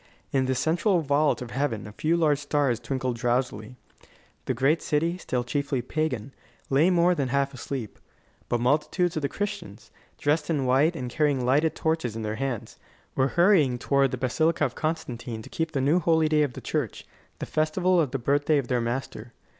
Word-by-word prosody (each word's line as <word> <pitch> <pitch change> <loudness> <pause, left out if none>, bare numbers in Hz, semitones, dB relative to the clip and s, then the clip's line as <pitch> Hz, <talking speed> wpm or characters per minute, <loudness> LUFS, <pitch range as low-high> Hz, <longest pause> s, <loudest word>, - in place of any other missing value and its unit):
In 130 -1 +1
the 130 - +1
central 170 - +1
vault 145 -1 +1
of 120 - -9
heaven 125 -4 -2
a 105 - -8
few 160 +10 0
large 150 -4 +2
stars 145 -5 0
twinkled 130 -2 -3
drowsily. 120 -1 -1 0.7
The 130 - -1
great 135 +7 +2
city, 165 +4 0
still 125 -7 -2
chiefly 135 0 -2
pagan, 135 -3 -2 0.4
lay 145 +6 +4
more 175 0 +4
than 140 -6 -1
half 140 +2 0
asleep. 130 -3 -6 0.5
But 120 - 0
multitudes 150 +7 +1
of 155 - -1
the 140 - -1
Christians, 205 - -5 0.3
dressed 150 +2 0
in 145 -5 0
white 140 +7 +3
and 125 -5 -4
carrying 140 -1 0
lighted 145 +5 +2
torches 160 -8 -1
in 115 - -4
their 110 0 -3
hands, 120 -5 -4 0.3
were 130 - +2
hurrying 170 -9 +4
toward 140 +2 +2
the - - -4
Basilica 155 +5 +1
of 125 - -3
Constantine 120 -8 -4
to - - -13
keep 160 0 -2
the 140 - 0
new 150 +7 +3
holy 160 -2 +3
day 155 -1 +3
of 145 -4 0
the - - -8
church, - - -3 0.3
the - - -5
festival 175 +3 +2
of 150 - 0
the 135 - -2
birthday 145 +4 +2
of 135 -4 -2
their 125 -2 +1
Master. 120 -1 -4
140 Hz, 190 wpm, -26 LUFS, 125-160 Hz, 0.7 s, lay